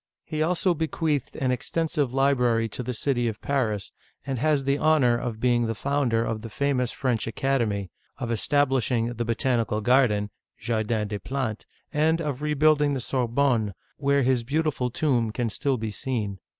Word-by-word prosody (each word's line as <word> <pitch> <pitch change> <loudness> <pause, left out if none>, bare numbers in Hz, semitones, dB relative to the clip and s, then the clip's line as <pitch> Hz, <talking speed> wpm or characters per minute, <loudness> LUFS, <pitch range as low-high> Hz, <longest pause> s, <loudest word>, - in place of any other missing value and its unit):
He 155 0 -4
also 175 +2 +2
bequeathed 160 -3 -1
an 130 -1 0
extensive 150 0 -1
library 125 -4 +2
to 115 - -4
the 125 0 -4
city 120 -2 0
of 110 -2 -3
Paris, 110 -9 -1 0.3
and 135 -3 -2
has 150 0 +2
the 140 +1 +1
honor 150 -6 +4
of 120 -2 -4
being 120 -1 +2
the 115 - -2
founder 125 -3 0
of 110 -1 -3
the 115 - -7
famous 125 0 0
French 125 -5 -1
Academy, 115 -6 -1 0.3
of 120 - -3
establishing 125 -2 +1
the 120 0 -3
Botan 120 +1 +1
ical 105 0 -3
Garden 105 -5 +3 0.3
(Jardin 110 -1 -1
des 105 0 -4
Plantes), 130 -4 -3 0.3
and 160 +2 +2
of 145 -4 -3
rebuilding 150 -1 +3
the - - -2
Sorbonne, 120 -4 0 0.2
where 140 -1 +2
his 125 -1 +2
beautiful 145 -1 0
tomb 125 -3 +1
can 115 +1 -2
still 135 +3 -1
be 110 -1 -3
seen. 105 -3 -3
125 Hz, 165 wpm, -26 LUFS, 115-140 Hz, 0.3 s, honor